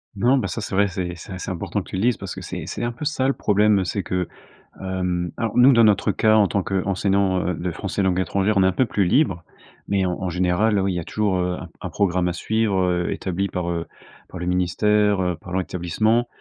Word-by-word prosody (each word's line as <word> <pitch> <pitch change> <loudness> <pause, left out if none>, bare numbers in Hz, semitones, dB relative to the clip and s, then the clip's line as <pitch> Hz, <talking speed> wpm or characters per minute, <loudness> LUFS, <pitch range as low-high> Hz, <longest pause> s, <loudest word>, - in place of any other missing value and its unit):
Non, 120 +7 +3
ben, 105 - -1
ça, 115 - -4
c'est 105 - -6
vrai, 100 +1 +3
c'est 90 -2 -4
c'est 85 - -11
assez 95 +1 -5
important 85 - -3
que - - -15
tu - - -5
le - - -1
dises 120 +2 +2
parce 100 -2 -6
que 95 - -8
c'est 90 -2 -6
c'est - - -5
un 120 - -1
peu 145 +6 -7
ça 135 -3 0
le 135 - +2
problème. 105 -2 +3
Heu, - - 0
c'est 100 +2 -2
que 90 -1 -2 0.5
hem, 90 -2 -2
alors 115 -1 -2
nous, 130 +3 +7
dans 115 -1 +5
notre 105 -2 +3
cas, 110 0 +3
en 105 -2 +5
tant 100 - 0
qu'enseignant, 95 0 0
heu, 90 - 0
de 90 +2 -3
français 95 +4 -3
langue 95 -1 +1
étrangère, 100 +3 0
on 95 - +5
est - - +4
un - - +3
peu 130 - +1
plus 105 -4 0
libre 90 - +2 0.5
mais 100 -2 +1
en 90 - 0
en 95 - -1
général, 90 +5 +1
heu, 95 - +2
oui, 95 -1 0
il - - -4
y - - -1
a - - -4
toujours, 100 +1 0
heu, 90 0 0
un - - -8
un - - -4
programme 90 -3 +1
à 90 - -1
suivre, 110 +2 0
heu, 90 -1 0
établi 95 +1 -2
par, 90 -1 -3
heu, 85 -1 -3 0.4
par 90 - -8
le 90 - -4
ministère, 100 +3 +2
heu, 90 -1 0
par 90 - -6
l'établissement 100 +6 0
95 Hz, 260 wpm, -22 LUFS, 90-105 Hz, 0.5 s, nous